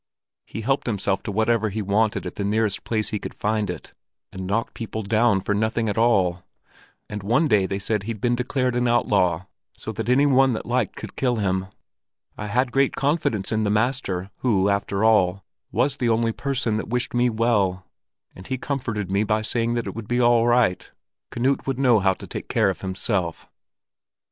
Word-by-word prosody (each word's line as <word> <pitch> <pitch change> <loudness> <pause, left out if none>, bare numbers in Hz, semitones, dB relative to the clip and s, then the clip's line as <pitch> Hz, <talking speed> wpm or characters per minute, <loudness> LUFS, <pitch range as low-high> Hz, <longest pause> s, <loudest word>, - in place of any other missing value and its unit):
He 110 - -6
helped 135 +4 0
himself 100 -3 0
to - - -5
whatever 110 +1 +1
he 105 +2 -3
wanted 105 +2 +1
at - - -5
the 100 - -4
nearest 105 0 0
place 110 -2 -1
he 105 - -2
could - - -7
find 105 0 -1
it, - - -7 0.4
and 95 0 -6
knocked 110 +4 -1
people 110 -1 -5
down 110 -1 +2
for 105 - -1
nothing 110 +2 0
at 105 - -1
all. 95 -7 +2 0.7
And 105 0 -6
one 120 +11 +2
day 105 -6 +3
they 95 - -2
said 105 +1 -1
that - - -11
he'd 115 -2 -4
been 120 +3 +1
declared 125 0 -1
an 125 0 +1
outlaw, 95 -7 +2 0.3
so 110 - -5
that 115 +1 -4
any 135 +3 +4
one 135 -2 +4
that 110 - -4
liked 125 +2 -1
could - - -8
kill 125 -2 +1
him. 95 -3 -1 0.7
I 105 - -5
had 125 +4 +1
great 135 0 +2
confidence 140 - 0
in 110 -1 +1
the 105 - +1
master, 105 -4 -1
who, 100 -6 +2
after 100 0 0
all, 100 -4 +3 0.3
was 135 +1 +1
the 120 -4 0
only 115 0 +2
person 125 -3 -1
that 110 - -5
wished 125 +1 -1
me 120 0 +3
well; 105 -5 +1 0.5
and 95 - -11
he 130 - -2
comforted 115 -8 -3
me 100 +2 +2
by 110 0 0
saying 115 +1 0
that 120 - -1
it - - -5
would 115 -2 -7
be 120 0 0
all 120 -1 +4
right: 120 -6 +2 0.4
Knut 130 +4 0
would 135 -2 -1
know 125 -5 +4
how 95 -1 +2
to - - -10
take - - -7
care - - +2
of - - -9
himself." 95 -2 -2
110 Hz, 200 wpm, -23 LUFS, 100-120 Hz, 0.7 s, any